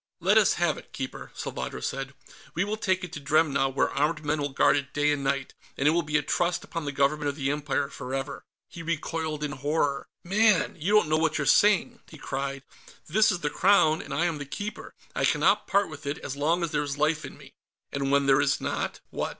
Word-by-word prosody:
"Let -, -, +3 dB
us -, -, +5 dB
have -, -, 0 dB
it, -, -, -18 dB
Keeper," -, -, -6 dB
Salvadro -, -, -5 dB
said. 135 Hz, +1 st, -4 dB, 0.4 s
"We 170 Hz, -, +2 dB
will 205 Hz, +1 st, -2 dB
take 190 Hz, -3 st, 0 dB
it 180 Hz, -, -7 dB
to -, -, -5 dB
Dremna, 140 Hz, -2 st, +2 dB
where 135 Hz, -, 0 dB
armed 150 Hz, +2 st, 0 dB
men 150 Hz, +1 st, 0 dB
will 145 Hz, -, -1 dB
guard 135 Hz, -, +3 dB
it 140 Hz, -2 st, -3 dB
day 145 Hz, 0 st, +3 dB
and 145 Hz, -1 st, -1 dB
night, 135 Hz, -1 st, -1 dB, 0.2 s
and 140 Hz, -, +2 dB
it -, -, +6 dB
will 170 Hz, +2 st, +2 dB
be 150 Hz, -1 st, 0 dB
a 150 Hz, -, -1 dB
trust 175 Hz, +3 st, 0 dB
upon 165 Hz, -4 st, -5 dB
the 145 Hz, -, -2 dB
Government 145 Hz, +1 st, +1 dB
of 140 Hz, -, -4 dB
the 140 Hz, -2 st, -1 dB
Empire 145 Hz, -1 st, -1 dB
forever." 135 Hz, +1 st, -5 dB, 0.2 s
He 170 Hz, -, -10 dB
recoiled 160 Hz, -1 st, -3 dB
in 150 Hz, -, -2 dB
horror. 145 Hz, 0 st, -1 dB, 0.2 s
"Man! 210 Hz, +1 st, +3 dB
You 180 Hz, +5 st, -1 dB
don't 210 Hz, -, +5 dB
know 155 Hz, 0 st, +2 dB
what 160 Hz, -1 st, +1 dB
you're 150 Hz, -, -1 dB
saying!" 205 Hz, +5 st, +4 dB
he 155 Hz, -, -12 dB
cried. 135 Hz, -1 st, -4 dB, 0.4 s
"This 215 Hz, +7 st, +3 dB
is 180 Hz, -, -3 dB
the 150 Hz, -, -1 dB
Crown, 170 Hz, -5 st, +4 dB
and -, -, -10 dB
I 170 Hz, -, +1 dB
am 165 Hz, -4 st, -1 dB
the 145 Hz, -, -5 dB
Keeper; 205 Hz, +9 st, -6 dB, 0.2 s
I -, -, 0 dB
cannot -, -, +3 dB
part 200 Hz, +1 st, +2 dB
with 155 Hz, -2 st, -9 dB
it 145 Hz, -, -2 dB
as 130 Hz, -, -6 dB
long 165 Hz, +5 st, +1 dB
as 165 Hz, -, -2 dB
there 150 Hz, -2 st, +1 dB
is 145 Hz, -1 st, -3 dB
life 155 Hz, +1 st, +1 dB
in -, -, -9 dB
me." -, -, -15 dB, 0.4 s
"And 140 Hz, -1 st, -2 dB
when 140 Hz, 0 st, +3 dB
there 135 Hz, -1 st, +5 dB
is -, -, +1 dB
not, -, -, -3 dB
what? -, -, -2 dB
150 Hz, 235 wpm, -27 LUFS, 140-170 Hz, 0.4 s, it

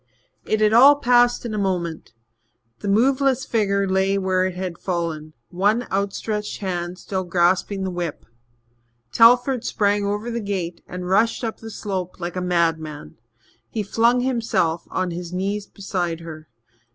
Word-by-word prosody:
It 215 Hz, 0 st, 0 dB
had 215 Hz, 0 st, +4 dB
all 270 Hz, +5 st, +8 dB
passed 245 Hz, -3 st, +3 dB
in 230 Hz, -, -4 dB
a 210 Hz, -, -1 dB
moment. 175 Hz, -, -2 dB, 0.7 s
The -, -, -6 dB
moveless 265 Hz, +5 st, +2 dB
figure 200 Hz, -4 st, +1 dB
lay 190 Hz, +1 st, +1 dB
where 185 Hz, -1 st, +1 dB
it 185 Hz, -, -6 dB
had 180 Hz, -2 st, -5 dB
fallen, 165 Hz, -4 st, -3 dB, 0.2 s
one 205 Hz, +6 st, +1 dB
outstretched 205 Hz, +2 st, -2 dB
hand 180 Hz, -2 st, -4 dB
still 190 Hz, +1 st, -3 dB
grasping 180 Hz, +2 st, +1 dB
the 190 Hz, -, -2 dB
whip. 175 Hz, -3 st, -4 dB, 0.9 s
Telford 245 Hz, +2 st, +5 dB
sprang 205 Hz, 0 st, +1 dB
over 205 Hz, +4 st, -2 dB
the 235 Hz, 0 st, -3 dB
gate 185 Hz, -4 st, -4 dB
and 180 Hz, 0 st, -6 dB
rushed 220 Hz, +7 st, +2 dB
up 225 Hz, -1 st, -3 dB
the 225 Hz, -, -9 dB
slope 190 Hz, -5 st, -5 dB
like 175 Hz, 0 st, -5 dB
a 185 Hz, -, -2 dB
madman. 160 Hz, -, -1 dB, 0.5 s
He 220 Hz, -, -3 dB
flung 235 Hz, +4 st, +2 dB
himself 230 Hz, -10 st, 0 dB
on 185 Hz, -1 st, -2 dB
his 175 Hz, 0 st, -6 dB
knees 200 Hz, +2 st, -2 dB
beside 175 Hz, -4 st, -3 dB
her. 155 Hz, -2 st, -10 dB
195 Hz, 150 wpm, -22 LUFS, 175-220 Hz, 0.9 s, all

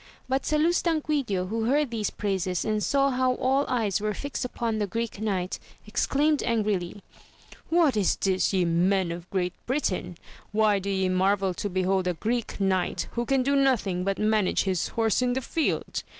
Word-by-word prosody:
But 265 Hz, +1 st, -1 dB
Salustanquidio 300 Hz, -, +1 dB
who 225 Hz, +1 st, -1 dB
heard 280 Hz, +1 st, +2 dB
these 220 Hz, -3 st, -1 dB
praises 190 Hz, -3 st, -2 dB
and 215 Hz, -1 st, 0 dB
saw 275 Hz, +3 st, +2 dB
how 255 Hz, 0 st, +1 dB
all 270 Hz, +3 st, +1 dB
eyes 220 Hz, -5 st, 0 dB
were 210 Hz, -1 st, -1 dB
fixed 285 Hz, +3 st, -4 dB
upon 230 Hz, -3 st, -2 dB
the 205 Hz, -, 0 dB
Greek 230 Hz, 0 st, -4 dB
Knight, 190 Hz, -4 st, -2 dB, 0.3 s
exclaimed 285 Hz, +7 st, +1 dB
angrily 205 Hz, -5 st, -1 dB, 0.3 s
— -, -, -22 dB
^What 330 Hz, -6 st, +4 dB
is 205 Hz, -3 st, +2 dB
this 190 Hz, -1 st, +1 dB
ye 185 Hz, -3 st, +2 dB
men 175 Hz, +2 st, +2 dB
of 170 Hz, +1 st, -7 dB
Great 180 Hz, -2 st, -1 dB
Britain? 185 Hz, -, -1 dB, 0.3 s
why 210 Hz, -1 st, +3 dB
do 195 Hz, +1 st, -4 dB
ye 190 Hz, -1 st, +1 dB
marvel 190 Hz, +1 st, +1 dB
to 205 Hz, -, -4 dB
behold 185 Hz, 0 st, 0 dB
a 180 Hz, -, 0 dB
Greek 230 Hz, +6 st, -2 dB
knight, 190 Hz, -2 st, 0 dB
who 240 Hz, 0 st, -2 dB
can 270 Hz, -1 st, +2 dB
do 280 Hz, +2 st, +1 dB
nothing 235 Hz, -10 st, +2 dB
but 195 Hz, +1 st, -1 dB
manage 215 Hz, -2 st, +2 dB
his 185 Hz, -3 st, 0 dB
horse 225 Hz, 0 st, +1 dB
in 250 Hz, -1 st, +1 dB
the 260 Hz, -, 0 dB
field 320 Hz, +5 st, -1 dB
210 Hz, 180 wpm, -26 LUFS, 190-255 Hz, 0.3 s, ^What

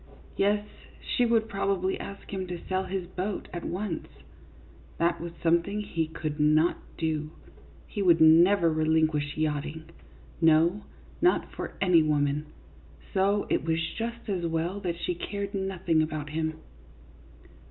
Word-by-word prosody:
Yes, 205 Hz, +1 st, +2 dB, 0.3 s
she 245 Hz, -2 st, +1 dB
would 225 Hz, -1 st, +2 dB
probably 195 Hz, -2 st, -1 dB
ask 200 Hz, 0 st, -8 dB
him 190 Hz, -1 st, -3 dB
to 175 Hz, -1 st, -5 dB
sell 190 Hz, 0 st, 0 dB
his 185 Hz, -1 st, -3 dB
boat 185 Hz, +3 st, -4 dB
at 175 Hz, -, -5 dB
once. 185 Hz, -1 st, -3 dB, 0.9 s
That 170 Hz, 0 st, +1 dB
was 170 Hz, 0 st, -5 dB
something 170 Hz, +5 st, +2 dB
that 210 Hz, -, -9 dB
he 165 Hz, -1 st, +1 dB
could 155 Hz, -1 st, -5 dB
not 155 Hz, +3 st, +4 dB, 0.2 s
do; 155 Hz, -2 st, -1 dB, 0.6 s
he 205 Hz, -, -4 dB
would 175 Hz, -4 st, +5 dB
never 170 Hz, +3 st, +6 dB
relinquish 155 Hz, -2 st, +1 dB
yachting, 155 Hz, +1 st, -2 dB, 0.5 s
no, 165 Hz, +5 st, +4 dB, 0.4 s
not 355 Hz, -, +2 dB
for -, -, -5 dB
any 180 Hz, -4 st, +5 dB
woman; 150 Hz, -1 st, +1 dB, 0.7 s
so 200 Hz, +2 st, +2 dB
it -, -, +2 dB
was 160 Hz, 0 st, 0 dB, 0.2 s
just 235 Hz, +1 st, -4 dB
as 180 Hz, -4 st, -1 dB
well 165 Hz, +4 st, -1 dB
that 175 Hz, -3 st, -3 dB
she 180 Hz, -, 0 dB
cared 200 Hz, +3 st, -5 dB
nothing 190 Hz, -4 st, 0 dB
about 155 Hz, -2 st, -3 dB
him. 160 Hz, 0 st, -2 dB
170 Hz, 140 wpm, -28 LUFS, 160-195 Hz, 0.9 s, never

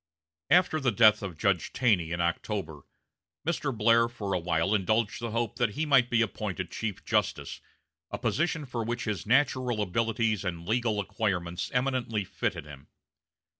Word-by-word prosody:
After 175 Hz, -3 st, +4 dB
the 130 Hz, -4 st, +1 dB
death 110 Hz, 0 st, +5 dB
of 95 Hz, -5 st, -6 dB
Judge 95 Hz, 0 st, 0 dB
Taney 100 Hz, -10 st, +2 dB
in 85 Hz, 0 st, -1 dB
October, 85 Hz, -2 st, -2 dB, 0.6 s
Mr. 150 Hz, -3 st, -1 dB
Blair 115 Hz, 0 st, +4 dB
for 100 Hz, -4 st, -4 dB
a 90 Hz, -, +1 dB
while 85 Hz, +3 st, 0 dB
indulged 110 Hz, +2 st, +1 dB
the 115 Hz, -, -3 dB
hope 115 Hz, +1 st, -2 dB
that 120 Hz, -5 st, 0 dB
he 155 Hz, -, -1 dB
might 135 Hz, -5 st, +4 dB
be 115 Hz, -1 st, +3 dB
appointed 95 Hz, -4 st, -4 dB
chief 105 Hz, -4 st, -4 dB
justice, -, -, -1 dB, 0.5 s
a -, -, -4 dB
position 160 Hz, -1 st, -1 dB
for 120 Hz, -3 st, -3 dB
which 120 Hz, +1 st, -3 dB
his 105 Hz, -3 st, -3 dB
natural 130 Hz, -2 st, +2 dB
abilities 110 Hz, +1 st, 0 dB
and 85 Hz, -3 st, -4 dB
legal 115 Hz, -1 st, +1 dB
acquirements 95 Hz, -4 st, -2 dB
eminently 125 Hz, -4 st, 0 dB
fitted 90 Hz, -3 st, -3 dB
him. 70 Hz, -2 st, -12 dB
110 Hz, 160 wpm, -28 LUFS, 95-120 Hz, 0.6 s, death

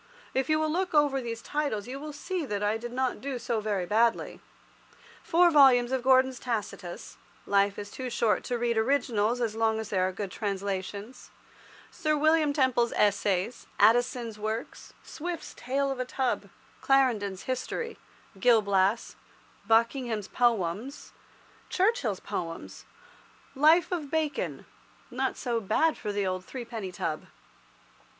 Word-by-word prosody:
If 265 Hz, +1 st, 0 dB
you 310 Hz, -, +4 dB
will 310 Hz, 0 st, 0 dB
look 360 Hz, 0 st, -1 dB
over 285 Hz, -3 st, +3 dB
these 230 Hz, -1 st, -5 dB
titles, 285 Hz, -9 st, -2 dB
you 265 Hz, +2 st, -6 dB
will 300 Hz, +1 st, -6 dB
see 340 Hz, +4 st, -4 dB
that 205 Hz, -1 st, -2 dB
I 205 Hz, +1 st, +1 dB
did 240 Hz, +1 st, -7 dB
not 255 Hz, +1 st, -1 dB
do 275 Hz, -1 st, -3 dB
so 235 Hz, -1 st, -2 dB
very 205 Hz, -4 st, -1 dB
badly. 230 Hz, +4 st, +1 dB, 0.8 s
Four 350 Hz, +1 st, +4 dB
volumes 260 Hz, -5 st, +6 dB
of 260 Hz, -1 st, 0 dB
Gordon's 260 Hz, 0 st, +4 dB
"Tacitus" 210 Hz, -7 st, -5 dB, 0.3 s
(life 200 Hz, 0 st, +2 dB
is 205 Hz, 0 st, -7 dB
too 255 Hz, -1 st, -5 dB
short 230 Hz, -2 st, +1 dB
to 245 Hz, -, -1 dB
read 235 Hz, -1 st, +1 dB
originals, 235 Hz, -3 st, +1 dB
so 230 Hz, -3 st, -2 dB
long 220 Hz, -1 st, +2 dB
as 220 Hz, -1 st, -5 dB
there 185 Hz, -2 st, +1 dB
are -, -, -2 dB
good 195 Hz, 0 st, -5 dB
translations), 200 Hz, +3 st, -4 dB, 0.6 s
Sir 310 Hz, -2 st, 0 dB
William 310 Hz, 0 st, +3 dB
Temple's 260 Hz, -4 st, +2 dB
Essays, 205 Hz, +1 st, +1 dB
Addison's 230 Hz, 0 st, +3 dB
works, 220 Hz, +3 st, -5 dB
Swift's 340 Hz, +1 st, -6 dB
"Tale 275 Hz, +3 st, -1 dB
of 265 Hz, -, -4 dB
a 255 Hz, -, -1 dB
Tub," 255 Hz, 0 st, -2 dB, 0.3 s
Clarendon's 225 Hz, -8 st, +2 dB
"History," 350 Hz, -, -4 dB, 0.4 s
"Gil 230 Hz, 0 st, +5 dB
Blas," 200 Hz, +2 st, +1 dB, 0.5 s
Buckingham's 225 Hz, -2 st, +1 dB
Poems, 230 Hz, -, -1 dB, 0.6 s
Churchill's 360 Hz, -, +1 dB
Poems, 170 Hz, -5 st, -6 dB, 0.7 s
"Life 315 Hz, +5 st, +4 dB
of 320 Hz, -6 st, -3 dB
Bacon"—not 285 Hz, -4 st, -4 dB
so 240 Hz, -2 st, -1 dB
bad 265 Hz, +11 st, +2 dB
for 210 Hz, -, -4 dB
the 200 Hz, -1 st, -1 dB
old 185 Hz, -1 st, -2 dB
threepenny 230 Hz, -5 st, -6 dB
tub. 160 Hz, -3 st, -3 dB
240 Hz, 140 wpm, -28 LUFS, 210-275 Hz, 0.8 s, volumes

